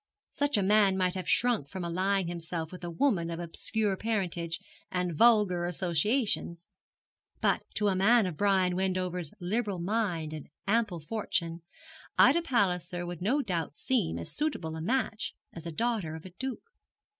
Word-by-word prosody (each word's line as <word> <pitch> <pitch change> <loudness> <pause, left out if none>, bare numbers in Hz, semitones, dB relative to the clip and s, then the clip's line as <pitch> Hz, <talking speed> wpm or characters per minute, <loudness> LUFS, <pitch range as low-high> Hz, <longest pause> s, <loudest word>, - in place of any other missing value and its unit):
Such 285 -4 +1
a 200 - +2
man 200 -1 +4
might 185 -1 +1
have 185 -2 -4
shrunk 235 - +2
from 185 +2 -5
allying 185 +3 +1
himself 165 -1 -4
with 180 -1 -10
a 175 - -3
woman 170 -2 +1
of 165 0 -4
obscure 205 +4 0
parentage 180 -6 -1 0.3
and 180 -2 -1
vulgar 210 -4 +5
associations; 175 - 0 0.7
but - - +2
to 210 - +1
a 200 - +3
man 220 +4 +5
of 180 -4 -3
Brian 190 -1 +2
Wendover's 185 -3 -1
liberal 205 +2 -1
mind 175 -4 -1
and 155 -2 -7 0.2
ample 205 -5 +1
fortune, 175 -2 -2 0.6
Ida 310 +7 +6
Palliser 180 - 0
would 175 -1 -6
no 265 +10 +2
doubt 170 - -3
seem 225 - 0
as 85 - -5
suitable 230 - -2
a 160 - -5
match 220 -1 -1 0.2
as 165 0 -8
a - - -4
daughter 210 -4 -1
of 160 - -10
a 185 - -9
duke. 260 +7 -5
185 Hz, 160 wpm, -30 LUFS, 170-215 Hz, 0.7 s, Ida